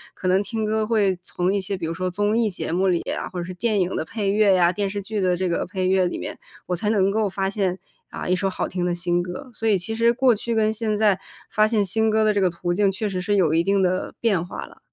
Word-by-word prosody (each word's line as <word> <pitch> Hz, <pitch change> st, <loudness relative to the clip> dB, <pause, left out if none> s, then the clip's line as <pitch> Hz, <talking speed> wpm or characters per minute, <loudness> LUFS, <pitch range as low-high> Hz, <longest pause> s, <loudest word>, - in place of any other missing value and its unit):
可 185 Hz, -, -4 dB
能 185 Hz, +2 st, +3 dB
听 220 Hz, +1 st, -3 dB
歌 215 Hz, 0 st, 0 dB
会 200 Hz, -5 st, +2 dB
从 180 Hz, +1 st, -1 dB
一 200 Hz, -, 0 dB
些 195 Hz, +1 st, -3 dB
比 175 Hz, -, -4 dB
如 165 Hz, -, -2 dB
说 185 Hz, +2 st, -2 dB
综 205 Hz, +4 st, 0 dB
艺 230 Hz, -2 st, +2 dB
节 180 Hz, -, -5 dB
目 185 Hz, +3 st, +1 dB
里 175 Hz, -2 st, +2 dB
啊， -, -, -4 dB
或 180 Hz, -, -5 dB
者 -, -, -2 dB
是 185 Hz, -, -6 dB
电 215 Hz, +3 st, 0 dB
影 180 Hz, 0 st, 0 dB
的 -, -, -1 dB
配 200 Hz, +4 st, -2 dB
乐 205 Hz, -2 st, +4 dB
呀、 175 Hz, -1 st, +4 dB
电 200 Hz, +2 st, -2 dB
视 200 Hz, 0 st, -4 dB
剧 210 Hz, +1 st, -3 dB
的 180 Hz, -1 st, +2 dB
这 185 Hz, +1 st, -1 dB
个 170 Hz, -, 0 dB
配 185 Hz, 0 st, -2 dB
乐 185 Hz, 0 st, +3 dB
里 -, -, -4 dB
面， -, -, -6 dB, 0.3 s
我 180 Hz, -, -1 dB
才 205 Hz, +4 st, -1 dB
能 200 Hz, -3 st, +3 dB
够 215 Hz, 0 st, +1 dB
发 195 Hz, 0 st, -1 dB
现， 195 Hz, -2 st, -1 dB, 0.3 s
啊， -, -, -6 dB
一 180 Hz, -, +3 dB
首 195 Hz, +1 st, 0 dB
好 190 Hz, -, -3 dB
听 180 Hz, -1 st, -3 dB
的 175 Hz, -1 st, 0 dB
新 175 Hz, 0 st, 0 dB
歌， 180 Hz, +8 st, -7 dB
所 225 Hz, 0 st, -1 dB
以 205 Hz, -, +4 dB
其 190 Hz, +5 st, -4 dB
实 230 Hz, +1 st, +4 dB
过 255 Hz, 0 st, +4 dB
去 230 Hz, +2 st, -2 dB
跟 220 Hz, 0 st, +2 dB
现 220 Hz, -1 st, -1 dB
在， 205 Hz, -3 st, +3 dB, 0.3 s
发 215 Hz, 0 st, +4 dB
现 215 Hz, -2 st, +1 dB
新 220 Hz, +4 st, +1 dB
歌 220 Hz, 0 st, +2 dB
的 215 Hz, 0 st, +3 dB
这 205 Hz, -, +1 dB
个 185 Hz, -, +3 dB
途 175 Hz, +1 st, -3 dB
径 200 Hz, +1 st, +2 dB
确 200 Hz, +3 st, -3 dB
实 185 Hz, -2 st, -3 dB
是 205 Hz, +3 st, 0 dB
有 170 Hz, -6 st, +3 dB
一 165 Hz, +1 st, +3 dB
定 195 Hz, +1 st, +2 dB
的 185 Hz, 0 st, -1 dB
变 200 Hz, -8 st, +1 dB
化 175 Hz, -, -7 dB
了。 -, -, -17 dB
195 Hz, 315 characters per minute, -23 LUFS, 180-215 Hz, 0.3 s, 乐